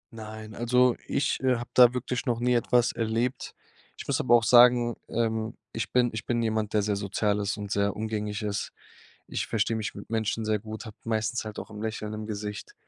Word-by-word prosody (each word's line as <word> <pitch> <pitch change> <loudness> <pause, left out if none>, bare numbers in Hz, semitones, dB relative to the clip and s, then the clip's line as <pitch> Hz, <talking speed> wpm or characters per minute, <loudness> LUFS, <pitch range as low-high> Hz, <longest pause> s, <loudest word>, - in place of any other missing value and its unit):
Nein, 110 -1 -8
also 125 +2 +3
ich, 140 - 0
äh, 130 -1 +3
habe 120 +1 -6
da 125 -1 +8
wirklich 125 +2 -3
noch 120 -2 +1
nie 125 +1 +2
etwas 120 0 +3
erlebt. 115 +3 -2 0.4
Ich - - -8
muss - - +1
aber 120 - +5
auch 115 - +4
sagen, 120 0 +6
ähm, 110 -1 -1 0.2
ich 115 - -4
bin 125 -1 +3
ich 110 - -5
bin 120 -1 +1
jemand, 110 -1 -1
der 105 - +2
sehr 105 0 0
sozial 100 +1 0
ist 105 +1 -2
und 100 -1 -6
sehr 100 -1 +1
umgänglich 105 -1 -3
ist. 105 -1 -3 0.5
Ich - - -2
verstehe 110 0 0
mich 110 -1 -3
mit - - -10
Menschen 110 0 -1
sehr 110 0 +1
gut, 110 +2 -8
habe 105 - -10
meistens 110 +1 -1
halt 110 -1 -6
auch - - -8
'n 105 -1 -9
Lächeln 110 -1 -4
im 105 0 -5
Gesicht. 105 -1 -6
110 Hz, 210 wpm, -27 LUFS, 105-120 Hz, 0.5 s, da